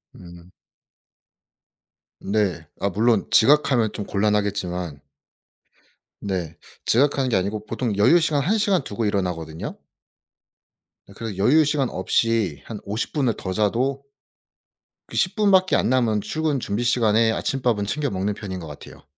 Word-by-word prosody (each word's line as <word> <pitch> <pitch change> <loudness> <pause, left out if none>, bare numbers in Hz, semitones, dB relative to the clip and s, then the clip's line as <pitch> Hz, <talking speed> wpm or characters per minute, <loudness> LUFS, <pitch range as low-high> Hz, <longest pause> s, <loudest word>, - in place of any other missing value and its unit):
음. 85 0 -14 1.7
네. 95 -6 -1
아 100 - 0
물론 110 +3 +1
지각하면 130 -4 +4
좀 105 - -6
곤란하겠지만 100 -6 -1 1.2
네. 90 -5 -3 0.3
지각하는 135 +1 +2
게 120 - +1
아니고 100 +3 -2
보통 115 0 -2
여유 165 +12 +5
시간 155 -3 +1
1 210 +9 +1
시간 200 -4 +1
두고 110 +2 -3
일어나거든요. 90 -6 -3 1.4
그래서 110 -4 -6
여유 145 +10 +4
시간 145 -3 0
없이 110 -11 0
한 110 -3 -7
50 105 +4 -3
분을 135 -6 +1
더 95 - -5
자도 120 +7 0 1.1
그 - - -11
10 185 - +1
분밖에 195 -3 +3
안 - - +1
남은 115 -5 +2
출근 155 -1 -1
준비 105 +4 -2
시간에 115 -2 +3
아침밥은 120 -3 -1
챙겨 145 +6 -1
먹는 100 +1 -2
편인 95 -3 -6
것 80 - -8
같아요. 75 -1 -12
110 Hz, 265 characters per minute, -23 LUFS, 100-135 Hz, 1.7 s, 여유